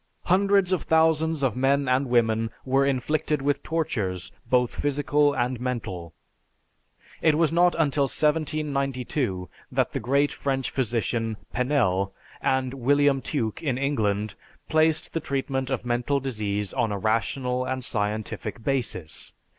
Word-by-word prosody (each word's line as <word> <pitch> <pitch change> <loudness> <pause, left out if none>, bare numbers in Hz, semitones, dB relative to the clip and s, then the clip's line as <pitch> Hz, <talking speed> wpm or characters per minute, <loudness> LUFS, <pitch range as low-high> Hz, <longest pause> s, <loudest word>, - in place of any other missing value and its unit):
Hundreds 195 0 +3
of 185 - +1
thousands 160 -1 +2
of 130 -6 +1
men 135 +2 +2
and 130 +2 +2
women 115 -2 +2 0.2
were 135 +1 +3
inflicted 140 +3 0
with 140 +1 0
tortures 105 - -2 0.2
both 125 -1 +3
physical 145 0 +2
and 125 0 -1
mental. 100 -10 -4 1.1
It 155 -2 +4
was 165 -1 +3
not 175 +1 +4
until 145 -3 +2
1792 140 - -1 0.2
that - - +1
the - - -2
great 140 +5 +2
French 135 -2 -2
physician 115 -2 -1 0.2
Penel, 100 -8 +1 0.3
and 130 -1 +1
William 140 +1 +3
Tuke 120 -3 -2
in 135 -6 -1
England, 110 -7 0 0.3
placed 160 0 +2
the 165 - 0
treatment 135 -3 -2
of 130 -2 -2
mental 120 +4 +1
disease 105 -6 -2
on 110 - 0
a 100 - -1
rational 125 +4 0
and 130 -1 -3
scientific 110 +1 -3
basis. 110 - -3
130 Hz, 130 wpm, -26 LUFS, 115-145 Hz, 1.1 s, It